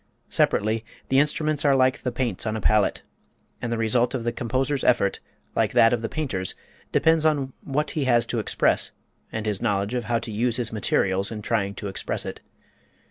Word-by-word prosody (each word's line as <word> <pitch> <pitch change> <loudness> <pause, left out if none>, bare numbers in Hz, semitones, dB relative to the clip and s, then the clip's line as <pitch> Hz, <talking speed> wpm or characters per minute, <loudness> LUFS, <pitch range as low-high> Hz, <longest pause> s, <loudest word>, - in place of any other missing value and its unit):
Separately, 110 +2 +1 0.3
the 135 - +4
instruments 150 0 +1
are 140 -2 +4
like 130 -1 +3
the 125 - -2
paints 120 -5 -2
on 110 0 -1
a - - -3
palette, 105 -1 +2 0.6
and 120 - -3
the 115 - 0
result 120 +3 +2
of 120 - -3
the 120 - 0
composer's 130 +4 -1
effort, 110 -5 +2 0.4
like - - +1
that 115 +1 +6
of 120 - 0
the 115 - -3
painter's, 115 -12 -3 0.4
depends 160 -1 +3
upon 145 -4 +1
what 150 +1 -1
he 150 -3 -1
has 120 -2 +3
to 115 0 -2
express 110 - +1 0.4
and 110 -1 -4
his 105 -3 -1
knowledge 100 +2 0
of 120 -2 -2
how 120 0 +1
to 115 0 -5
use 115 +3 0
his 120 -2 -2
materials 95 -2 +1
in 105 -2 -6
trying 100 -3 0
to 105 - -5
express 95 - -4
it. - - -6
120 Hz, 195 wpm, -25 LUFS, 110-130 Hz, 0.6 s, that